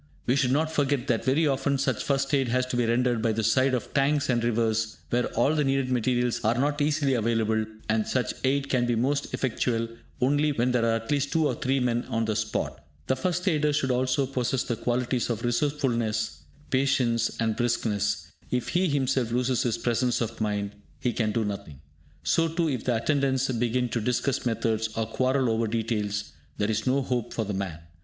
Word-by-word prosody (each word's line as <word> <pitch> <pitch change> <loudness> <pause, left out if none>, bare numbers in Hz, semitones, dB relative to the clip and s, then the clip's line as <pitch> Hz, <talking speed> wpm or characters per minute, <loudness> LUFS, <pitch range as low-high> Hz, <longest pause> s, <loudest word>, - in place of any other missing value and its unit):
We 125 - +2
should 130 -2 +2
not 155 +3 +1
forget 145 -4 +1
that 120 -5 0
very 145 +5 +3
often 140 0 +1
such 135 - 0
'First 140 0 0
aid' 135 -2 +3
has 125 +2 +1
to 130 - -4
be 120 -1 +1
rendered 120 0 +2
by 115 -1 +1
the 110 +1 -1
side 130 +4 +3
of 125 - -5
tanks 140 0 +2
and 120 -1 +1
rivers, 110 -1 0
where 120 +1 +2
all 120 +6 +3
the 150 -1 +2
needed 135 -1 0
materials 125 0 +1
are 115 +2 +2
not 145 +3 0
easily 145 -2 +2
available, 110 -2 +1 0.2
and 110 0 +1
such 130 -1 0
aid 140 +1 +1
can 125 -3 +1
be 120 - +1
most 140 +5 0
effectual 115 -2 -1 0.3
only 145 +3 +2
when 125 -1 +1
there 120 -2 +2
are 115 0 +2
at 115 +4 -4
least 145 -1 +1
two 160 -1 +2
or - - 0
three 135 +1 0
men 120 -1 0
on 115 0 0
the 110 -1 -1
spot. - - -2 0.2
The 130 - +1
first 180 +6 -2
aider 150 -4 +2
should 140 -3 +1
also 130 +2 +1
possess 130 -1 -1
the 120 - -2
qualities 125 +1 -1
of 115 -3 -2
resourcefulness, 120 -4 0 0.3
patience, 130 -3 +1
and 110 -1 +1
briskness; 110 -4 0 0.2
if 125 -1 -1
he 180 +2 +2
himself 135 -5 0
loses 125 +1 +1
his 120 -2 0
presence 120 +1 0
of 115 -1 -3
mind, 105 -1 -1 0.3
he 125 -2 0
can 110 -2 0
do 110 0 0
nothing. 100 -9 -6 0.4
So 165 0 +2
too, 165 0 0
if 125 -4 -3
the 125 - +2
attendants 135 +1 +1
begin 120 +1 0
to 115 - -1
discuss 125 +3 0
methods, 110 -1 0
or 115 - +1
quarrel 130 +3 +1
over 115 0 +1
details, 105 -2 -2 0.3
there 105 +1 0
is 110 - -2
no 135 +2 +2
hope 125 -3 -2
for 110 - -1
the 105 - -3
man. 95 -4 -3
125 Hz, 205 wpm, -27 LUFS, 115-135 Hz, 0.4 s, very